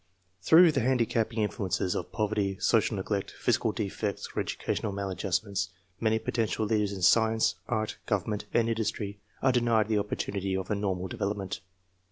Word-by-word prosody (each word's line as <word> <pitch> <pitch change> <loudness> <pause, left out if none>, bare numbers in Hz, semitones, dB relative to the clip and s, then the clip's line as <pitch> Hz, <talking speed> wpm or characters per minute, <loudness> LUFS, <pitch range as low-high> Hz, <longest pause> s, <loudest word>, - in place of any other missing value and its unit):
Through 165 - +7
the 140 - +1
handicapping 115 -2 +1
influences 95 -3 -1
of - - -4
poverty, 105 -3 0
social 115 -1 +2
neglect, 100 0 -3
physical - - +2
defects, 100 0 -3
or - - 0
educational 105 - -2
maladjust 95 -2 -1
ments, 100 -2 -2 0.3
many 110 -1 +2
potential 110 -1 -1
leaders 105 -2 +1
in 95 -2 -5
science, 110 +3 +4
art, 110 -2 -2
govern 105 0 0
ment, 105 0 -3
and 115 -1 +2
industry 110 -3 -2 0.2
arc 130 -1 +4
denied 115 -3 +2
the 110 -2 +3
opportunity 100 -1 -2
of 95 +1 -4
a - - +2
normal 95 -2 -1
development. 100 0 -3
105 Hz, 160 wpm, -29 LUFS, 100-110 Hz, 0.3 s, Through